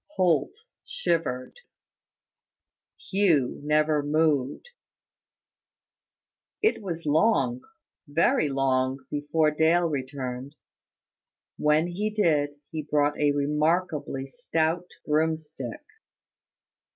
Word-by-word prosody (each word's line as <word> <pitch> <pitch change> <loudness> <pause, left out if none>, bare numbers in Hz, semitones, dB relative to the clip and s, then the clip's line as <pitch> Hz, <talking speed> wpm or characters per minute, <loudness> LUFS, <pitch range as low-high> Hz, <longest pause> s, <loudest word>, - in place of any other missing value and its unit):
Holt 185 - +2 0.3
shivered. 165 - -2 1.5
Hugh 175 -10 +2
never 150 0 +2
moved. 145 - 0 2.0
It 440 - +2
was 170 -5 -5
long, 145 - +2 0.5
very 150 0 +2
long, 130 -1 0
before 150 +1 +1
Dale 165 +3 +3
returned. 130 -1 -5 1.0
When 150 +2 +3
he 190 +5 -2
did, 155 -9 +1 0.2
he 155 - -3
brought 145 0 0
a 145 -1 +3
remarkably 150 -1 0
stout 165 - -1 0.2
broomstick. 160 - -2
150 Hz, 80 wpm, -26 LUFS, 145-170 Hz, 2.0 s, Dale